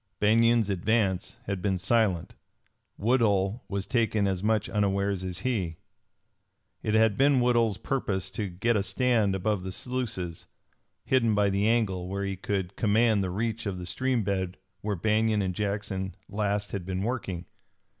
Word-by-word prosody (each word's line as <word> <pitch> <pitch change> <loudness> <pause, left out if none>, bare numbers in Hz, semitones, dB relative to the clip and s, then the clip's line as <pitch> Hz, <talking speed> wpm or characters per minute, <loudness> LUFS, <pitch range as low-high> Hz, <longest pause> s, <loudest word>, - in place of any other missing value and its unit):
Banion's 115 0 +4
advance 100 +1 0
had 100 -4 -3
been 95 -1 +1
silent. 100 -2 +1 0.6
Woodhull 105 -2 +2
was 100 -1 -2
taken 110 -4 +1
as 95 -2 0
much 110 0 +1
unawares 100 -2 0
as 95 0 -4
he. 95 -10 -1 1.0
It 110 - 0
had 110 -2 +4
been 140 -1 +5
Woodhull's 120 -4 +2
purpose 95 -8 -2
to 100 0 -3
get 115 +7 0
a 100 - +2
stand 110 -2 +1
above 100 +1 0
the 95 0 -5
sluices, 110 -7 -3 0.6
hidden 115 -5 +3
by 100 -1 +3
the 100 +2 +1
angle, 100 -6 +1
where 100 +1 -3
he 100 0 -2
could 95 0 -3
command 110 -1 +3
the 95 - -2
reach 110 +3 -2
of 95 -2 -3
the 90 - -6
stream 130 +4 0
bed 95 -2 -2 0.2
where 105 -1 -1
Banion 110 +2 +2
and 95 -1 -1
Jackson 100 -1 -3
last 100 0 -1
had 100 -3 -3
been 95 +1 -3
working. 100 -7 -3
100 Hz, 155 wpm, -28 LUFS, 95-115 Hz, 1.0 s, been